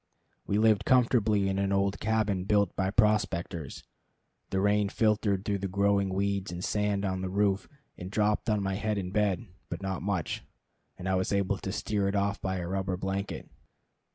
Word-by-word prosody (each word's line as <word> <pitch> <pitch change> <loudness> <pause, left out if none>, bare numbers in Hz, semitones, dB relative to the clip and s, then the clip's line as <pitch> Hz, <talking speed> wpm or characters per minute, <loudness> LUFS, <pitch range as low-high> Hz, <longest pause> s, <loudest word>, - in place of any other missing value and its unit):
We 100 - +1
lived 110 -1 +4
comfortably 110 -5 +3
in 95 0 0
an 100 0 0
old 100 0 +1
cabin 105 -4 0
built 100 -2 +2
by 95 -1 0
prospectors. 95 - 0 0.7
The 95 - 0
rain 105 +1 +2
filtered 105 -3 +1
through 100 -1 0
the 100 - -2
growing 100 0 +2
weeds 100 0 -1
and 90 +1 -5
sand 105 -1 0
on 95 -1 -1
the 95 - -3
roof 100 0 +1 0.3
and 90 - -6
dropped 105 +2 +1
on 105 -2 +1
my 95 0 -1
head 105 +2 -1
in 90 -2 -3
bed; 105 -1 +1 0.2
but - - -5
not 95 -2 -2
much, 95 -4 -2 0.5
and 95 - -6
I 95 - +1
was 95 0 0
able 100 0 +1
to 95 - -4
steer 100 0 -1
it 100 - -1
off 100 0 0
by 95 -1 -2
a 85 -1 -4
rubber 95 0 -2
blanket. 95 +2 -3
100 Hz, 185 wpm, -29 LUFS, 95-105 Hz, 0.7 s, lived